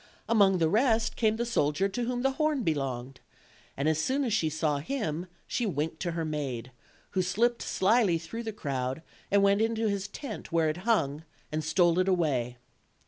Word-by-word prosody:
Among 200 -4 +4
the 165 -2 +3
rest 225 +4 +2
came 220 -2 +2
the 235 - -1
soldier 190 -5 +1
to 235 +5 -3
whom 245 0 -2
the 270 - +3
horn 300 -2 0
belonged, 135 - -2 0.6
and 140 +2 0
as 155 0 +2
soon 270 - 0
as 235 -5 0
she 165 -7 +2
saw 155 -2 0
him 170 - -3 0.2
she 240 - -1
winked 160 -2 -2
to 175 -2 -2
her 165 -1 -2
maid, 135 -6 -4 0.4
who 190 - +1
slipped 230 +6 +1
slyly 200 -3 +2
through 170 +8 -6
the 225 -1 -4
crowd 135 -5 -3 0.3
and 200 0 +4
went 200 +1 +4
into 225 0 +1
his 200 -1 -2
tent 250 -8 -7
where 165 -1 +2
it 155 - -2
hung, 150 -10 +1 0.3
and 155 +1 -2
stole 170 +2 +3
it 185 - +2
away. 140 -10 +1
180 Hz, 190 wpm, -29 LUFS, 155-225 Hz, 0.6 s, Among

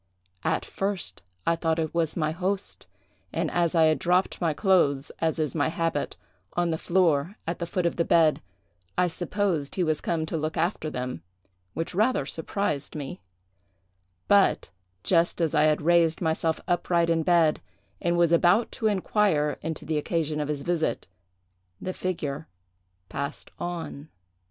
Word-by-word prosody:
At - - 0
first 195 -1 -3 0.2
I 170 - +3
thought 165 -1 0
it 160 -2 -2
was 165 -1 +1
my 155 -2 +1
host, 190 +4 -3 0.4
and - - -1
as 170 -1 +1
I 165 - +5
had 155 0 +3
dropped 180 +2 +1
my 165 -2 +2
clothes, 150 -6 +2
as 160 0 0
is 155 -5 0
my - - +1
habit, 165 -2 -1 0.4
on 175 -1 +1
the 160 - 0
floor 170 -1 +2
at 170 - -3
the 170 - -3
foot 180 0 -1
of 170 - 0
the 170 - +3
bed, 160 -2 +4 0.6
I 180 - +4
supposed 175 -3 -1
he 185 - +1
was 155 -2 0
come 160 -2 -1
to 160 - -3
look 155 +1 -3
after 165 -1 0
them, 125 -3 -4 0.5
which 165 +2 -3
rather 215 - +2
surprised 160 -2 -2
me: 140 -9 -6 1.1
but, 200 - +3 0.3
just 170 0 +2
as 165 -2 +1
I 150 -1 +4
had 155 -1 +2
raised 170 -1 +4
myself 160 -1 0
upright 175 -1 +2
in 165 -1 +2
bed, 165 -2 +3 0.4
and 170 0 +1
was 170 -1 +4
about 175 +7 +4
to 225 - -1
inquire 190 -6 +1
into 160 0 -4
the 155 -1 0
occasion 155 -1 -1
of 150 - -1
his 145 -2 -2
visit, 170 -1 -1 0.7
the 185 - -4
figure 160 -5 -3 0.6
passed 140 +6 -5
on. 165 -4 -5
165 Hz, 160 wpm, -26 LUFS, 155-175 Hz, 1.1 s, I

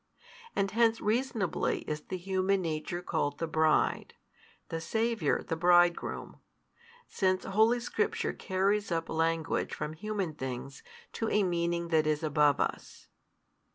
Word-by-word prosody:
And 195 0 0
hence 230 0 +3
reasonably 220 -4 0
is 150 0 -4
the 185 - -5
human 190 +1 0
nature 165 +2 -3
called 145 -4 -1
the 165 - -2
bride, 160 -1 +1 0.5
the 165 - -3
Saviour 220 -2 0
the 165 - -3
Bridegroom; 175 +1 +2 0.7
since 185 -2 0
holy 220 +5 +3
Scripture 435 - -1
carries 200 +1 0
up 165 -1 -1
language 165 0 0
from 150 - -4
human 195 -1 -3
things 130 -1 -6 0.3
to 225 - -2
a 210 - +3
meaning 170 -1 -1
that 155 -2 +3
is 155 0 0
above 150 -2 +3
us. - - -4
175 Hz, 130 wpm, -30 LUFS, 160-205 Hz, 0.7 s, hence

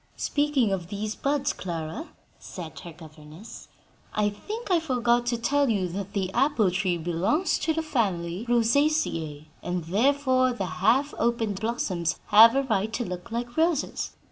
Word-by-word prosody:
"Speaking 290 -7 +1
of 180 -3 -2
these 210 +2 -4
buds, 285 +2 -1
Clara," 170 - -5 0.3
said 170 -4 -8
her 170 - -9
governess, 155 +4 -12 0.5
"I 210 -1 +2
think 420 - -6
I 350 - +4
forgot 245 -5 +1
to 240 -1 +1
tell 280 +3 +1
you 195 -5 +1
that 200 +2 -6
the 190 -2 -2
apple 245 -7 +2
tree 180 -1 0
belongs 175 - 0
to 320 - 0
the 320 0 -1
family 195 - -2
Rosaceae, 230 - +1 0.2
and 180 -1 -3
therefore 255 - +2
the 200 -5 -3 0.2
half 260 +8 +3
opened 225 -4 0
blossoms 185 -7 -2
have 225 +3 +8
a 275 - +2
right 220 -4 0
to 240 - -2
look 180 +2 -6
like 240 +1 -4
roses. 325 -2 0
225 Hz, 155 wpm, -26 LUFS, 180-275 Hz, 0.5 s, have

